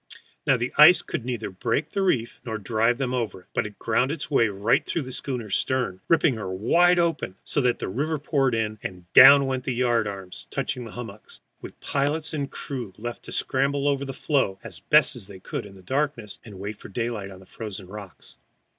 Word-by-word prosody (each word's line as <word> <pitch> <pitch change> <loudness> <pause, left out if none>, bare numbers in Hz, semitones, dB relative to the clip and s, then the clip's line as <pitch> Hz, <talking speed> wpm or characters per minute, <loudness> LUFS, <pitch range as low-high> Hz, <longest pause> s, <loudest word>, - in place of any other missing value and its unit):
Now, 135 - +5
the 120 +2 -3
ice 160 +5 +9
could 120 - -4
neither 120 -5 -3
break 115 +9 -1
the 200 - -2
reef 125 -11 0
nor 110 -3 -4
drive 115 +3 +1
them 130 -2 -2
over 115 -6 -2
it, - - -26
but - - 0
it 105 - -13
ground 125 +4 +1
its 155 -1 -5
way 115 -5 +4
right 100 +2 +1
through 165 - -2
the 130 - -8
schooner's 120 -6 -3
stern, 125 -8 -1
ripping 160 -6 +3
her 105 -4 -5
wide 175 - +3
open, 165 - 0
so 145 - 0
that 125 -2 +2
the - - -4
river 150 +10 -1
poured 135 -4 +1
in, 110 -1 -2
and 90 -1 -7
down 140 0 +10
they - - 0
went 130 -1 -1
until 130 0 -3
the - - -6
yard 120 -3 +2
arms 95 -2 -7
touched 135 -1 -2
the 125 -3 -8
hummocks, 110 -3 -9 0.2
with - - -10
pilot 150 +3 -1
and 140 -3 -2
crew 125 -8 -6
left 120 +2 -6
to - - -9
scramble 140 +1 0
over 140 -1 +1
the 135 - -4
floe 135 -8 0
as 95 -7 -9
best 140 -1 +3
they 100 -2 -11
could 100 - -5
in 100 - -14
the 95 - -15
darkness, 130 -2 -2
and 105 -4 -11
wait 100 +2 -6
for - - -11
daylight 115 -2 -3
on 95 -1 -11
the 95 - -16
frozen 100 -1 -7
rocks. 100 -1 -11
120 Hz, 220 wpm, -25 LUFS, 105-140 Hz, 0.2 s, down